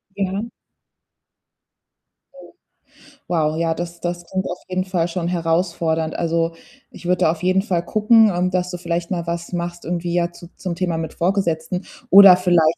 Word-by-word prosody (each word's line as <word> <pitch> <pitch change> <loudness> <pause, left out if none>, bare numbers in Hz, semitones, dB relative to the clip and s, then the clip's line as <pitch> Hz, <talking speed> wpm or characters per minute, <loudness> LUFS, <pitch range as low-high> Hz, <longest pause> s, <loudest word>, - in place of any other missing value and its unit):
Ja. 200 +3 -2 1.8
Oh. - - -14 0.8
Wow, 155 -3 0
ja, 165 0 +1
das 170 +1 -6
das 175 0 -4
klingt 190 0 -2
auf 180 - -4
jeden 185 0 -1
Fall 180 -3 0
schon 170 0 -3
herausfordernd. 165 -2 0
Also, 165 0 0 0.4
ich - - -13
würde 180 0 +1
da 160 - +4
auf 165 +1 -7
jeden 185 +1 +3
Fall 180 -5 -1
gucken, 215 +2 +4
ähm, 180 +1 0
dass 180 0 -1
du 180 - -5
vielleicht 170 0 -3
mal 170 -2 -2
was 170 +1 -4
machst 175 0 -4
irgendwie 175 0 -2
ja 175 0 +1
zu 175 0 -13
zum 180 -3 -4
Thema 175 -2 -1
mit 160 -1 -4
Vorgesetzten 180 -1 -1 0.2
oder 195 -3 +10
vielleicht 170 -3 +3
175 Hz, 170 wpm, -20 LUFS, 170-185 Hz, 1.8 s, oder